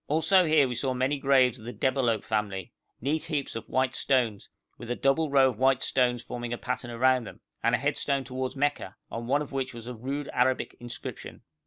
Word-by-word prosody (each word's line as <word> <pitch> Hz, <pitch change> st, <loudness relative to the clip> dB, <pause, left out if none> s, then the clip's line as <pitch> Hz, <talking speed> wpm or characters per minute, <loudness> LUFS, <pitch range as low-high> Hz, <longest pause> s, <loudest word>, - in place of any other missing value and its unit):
Also 165 Hz, +5 st, +4 dB
here 155 Hz, -3 st, +4 dB
we 125 Hz, -, -3 dB
saw 130 Hz, +1 st, -1 dB
many 135 Hz, +3 st, 0 dB
graves 130 Hz, -2 st, +3 dB
of 110 Hz, -, -12 dB
the 120 Hz, -, -5 dB
Debalohp 125 Hz, -5 st, +1 dB
family 105 Hz, -4 st, -2 dB, 0.3 s
neat 150 Hz, +5 st, -1 dB
heaps 145 Hz, -7 st, -2 dB
of 115 Hz, -, -6 dB
white 130 Hz, 0 st, +1 dB
stones, 120 Hz, -6 st, 0 dB, 0.3 s
with 120 Hz, -, -8 dB
a 120 Hz, -, 0 dB
double 140 Hz, +5 st, +2 dB
row 135 Hz, -1 st, +5 dB
of 110 Hz, -, -13 dB
white 135 Hz, 0 st, +3 dB
stones 125 Hz, -2 st, +1 dB
forming 120 Hz, -1 st, -5 dB
a 120 Hz, -, -2 dB
pattern 120 Hz, -, -4 dB
around 125 Hz, +1 st, +2 dB
them, -, -, -10 dB, 0.2 s
and 115 Hz, +1 st, +3 dB
a -, -, +1 dB
headstone 140 Hz, 0 st, 0 dB
towards 130 Hz, +1 st, -4 dB
Mecca, 145 Hz, +1 st, -1 dB, 0.2 s
on 115 Hz, +1 st, -5 dB
one 145 Hz, +3 st, +2 dB
of 145 Hz, -, -11 dB
which 135 Hz, -2 st, -3 dB
was 115 Hz, -1 st, -9 dB
a 125 Hz, -, -5 dB
rude 135 Hz, +5 st, -4 dB
Arabic 130 Hz, +1 st, +1 dB
inscription. 120 Hz, 0 st, -8 dB
130 Hz, 210 wpm, -28 LUFS, 120-140 Hz, 0.3 s, row